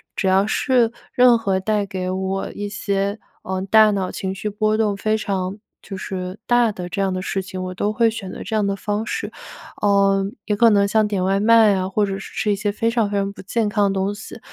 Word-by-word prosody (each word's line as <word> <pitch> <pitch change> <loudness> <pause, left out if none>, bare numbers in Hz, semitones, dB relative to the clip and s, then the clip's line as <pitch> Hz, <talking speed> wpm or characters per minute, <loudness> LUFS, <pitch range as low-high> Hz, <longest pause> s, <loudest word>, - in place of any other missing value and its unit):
只 190 - -1
要 190 +2 +4
是 240 0 +2 0.2
任 245 -1 +6
何 195 -4 0
带 205 0 0
给 185 -1 -3
我 190 +1 -2
一 205 0 -5
些， 200 0 -2 0.2
呃， 190 0 -3
大 220 -1 +7
脑 195 -3 -1
情 190 0 -4
绪 210 - -4
波 215 +1 +1
动 210 -2 +1
非 215 +2 0
常 195 -2 -3 0.2
就 195 - -8
是 185 0 -5
大 240 -2 +3
的 180 -3 -6
这 200 +2 -2
样 195 - +1
的 185 0 -3
事 195 - -2
情， 185 -1 -6
我 185 0 -5
都 205 +3 -1
会 230 0 +2
选 200 -4 -7
择 - - -7
这 220 - -3
样 205 -2 +1
的 200 - 0
方 210 +2 -2
式。 - - -4 0.5
呃， 200 -1 +3 0.2
也 210 - 0
可 230 +2 +5
能 200 -1 +3
像 215 +1 +2
点 200 -3 -1
外 195 +1 +2
卖 225 -1 +5
啊， 185 -1 -1
或 205 +2 +1
者 195 0 -4
是 - - -10
吃 210 - 0
一 205 - +2
些 205 +1 -1
非 225 +3 0
常 230 -3 +1
非 205 - -1
常 200 0 -1
不 - - -11
健 215 +3 -1
康 205 -1 +1
的 - - -3
东 195 +1 0
西， 220 +2 -10
200 Hz, 260 characters per minute, -21 LUFS, 195-215 Hz, 0.5 s, 大